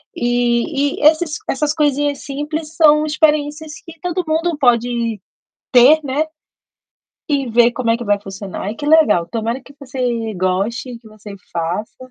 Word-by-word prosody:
e 245 +4 0
esses 310 0 +3
essas 295 +2 0
coisinhas 290 -2 0
simples 300 +3 -5
são 300 -2 +5
experiências 300 0 0
que 330 -1 -12
todo 360 +2 -2
mundo 320 +1 0
pode 235 -3 +1 0.5
ter, 255 +5 +7
né, 285 +3 -1 1.0
e 280 -4 0
ver 235 +1 +4
como 240 -2 -1
é 230 - +3
que 240 - -7
vai 205 -1 +1
funcionar. 195 -1 -7
Ai, 205 +3 -4
que 290 - -8
legal! 295 - +4
Tomara 230 +3 -2
que 280 - -16
você 245 -5 -3
goste, 200 +7 -2
que 230 - -20
você 215 -1 -11 0.2
faça 210 +9 -4
255 Hz, 150 wpm, -18 LUFS, 230-300 Hz, 1.0 s, ter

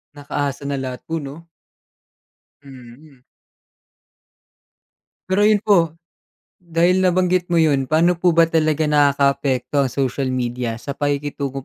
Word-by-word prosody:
Naka-asa 145 -1 -4
na 140 - -2
lahat 130 -2 -5
po 165 - -2
'no? 155 +5 -10 1.2
Mhm. 130 +1 -15 2.1
Pero 190 +2 +1
'yun 210 -1 +3
po 175 -7 +2 0.7
dahil 175 +2 +1
nabanggit 180 -1 +1
mo 175 - 0
'yun, 145 -5 +2
paano 165 +3 +3
po 175 -1 +2
ba 165 - +6
talaga 155 -1 0
nakaka-apekto 140 -2 +1
ang - - -5
social 135 0 -2
media 120 -2 -3
sa 120 +4 -6
pakikitungo 140 -1 -3
145 Hz, 120 wpm, -20 LUFS, 135-165 Hz, 2.1 s, ba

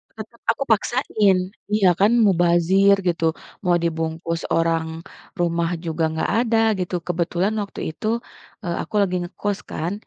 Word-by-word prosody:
Tetap 220 +1 -10
aku 230 +4 +1
paksain 205 -5 +2 0.2
iya, 205 -3 +4
kan 205 +3 +5
mubazir 180 +2 +4
gitu, 165 -2 +1 0.3
mau 180 -2 +2
dibungkus 165 0 -2
orang 165 0 0 0.3
rumah 170 -1 0 0.2
juga 165 0 -1
enggak 160 0 -2
ada, 230 -2 +1 0.2
gitu. 180 0 -2
Kebetulan 175 +3 0
waktu 200 -5 -5
itu, 190 - -6 0.6
eee, 170 -3 -2
aku - - -8
lagi 185 -2 -1
ngekos 195 +3 -3
kan, 170 +4 -3
175 Hz, 135 wpm, -22 LUFS, 165-200 Hz, 0.6 s, kan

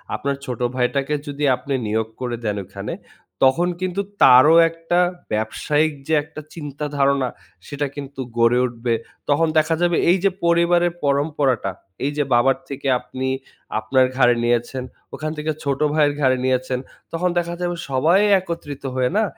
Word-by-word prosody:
আপনার 140 0 -2
ছোট 125 -2 -5 0.2
ভাইটাকে 135 +3 0
যদি 145 +1 -4
আপনে 140 +2 -5
নিয়োগ 110 +1 0
করে 120 -1 -2
দেন 105 -1 -1
ওখানে, 100 +1 -6 0.5
তখন 165 +7 +4
কিন্তু 185 +2 -1 0.2
তারও 130 +5 +8
একটা 165 +1 -1 0.3
ব্যবসায়িক 150 +8 0
যে 160 - 0
একটা 155 0 -10
চিন্তা 150 -2 -6
ধারণা, 140 -1 +2 0.4
সেটা 145 0 -2
কিন্তু 140 -1 -7 0.2
গড়ে 115 +1 +4
উঠবে। 120 -1 -2 0.4
তখন 155 +3 +3
দেখা 155 +1 +3
যাবে 175 -1 +2
এইযে 190 +2 +3 0.2
পরিবারের 170 0 +3
পরম্পরাটা, 140 -6 +1 0.3
এই 145 - 0
যে 145 - +2
বাবার 120 +3 +4
থেকে 140 0 -5
আপনি 130 +1 -5 0.5
আপনার 130 -1 +3
ঘাড়ে 120 -2 +5
নিয়েছেন, 120 +2 0 0.3
ওখান 155 0 -4
থেকে 155 +1 -1
ছোট 140 -2 -1
ভাইয়ের 150 -2 +3
ঘাড়ে 130 -2 +3
নিয়েছেন, 130 0 0 0.3
তখন 180 +2 0
দেখা 170 0 -3
যাবে 175 0 -1
সবাই 155 +8 +3 0.2
একত্রিত 170 -6 -7
হয়ে 125 -1 +1
না 220 - +3
140 Hz, 150 wpm, -21 LUFS, 130-160 Hz, 0.5 s, তারও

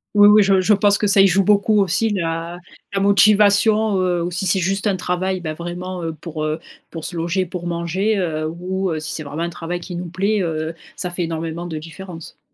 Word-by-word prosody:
Oui 205 0 +8
oui, 210 +1 +7
je 195 -1 +4
je 185 +3 +3
pense 205 0 +3
que - - -1
ça 200 -1 +5
y 195 - +7
joue 195 +1 +3
beaucoup 210 +2 +3
aussi, 200 +4 +1
la 170 -3 -3 0.4
la 195 - 0
motivation, 205 +1 +4
heu, 175 -2 0
ou 175 - -3
si 180 +2 -2
c'est 190 +2 +2
juste 195 +3 -1
un 200 - +2
travail, 185 +1 -2
ben, 160 -3 -4
vraiment, 175 +2 -6
heu, 165 -1 -3
pour, 155 -2 -5
heu, 155 +1 -2 0.3
pour 165 -2 -8
se 175 - -6
loger, 170 +3 -1
pour 175 0 -6
manger, 175 +5 -1
heu, 155 -4 -1
ou 185 +3 -3
heu, 160 - -2
si 155 0 -5
c'est - - -4
vraiment 150 +3 -4
un 170 - -2
travail 175 +1 -5
qui 175 0 -8
nous 175 +1 -5
plaît. 200 +5 0
Heu, 160 -2 -2 0.2
ça 180 - -4
fait 175 0 -2
énormément 165 +1 -4
de 160 -2 -5
différence. 165 +1 -10
180 Hz, 230 wpm, -20 LUFS, 165-195 Hz, 0.4 s, Oui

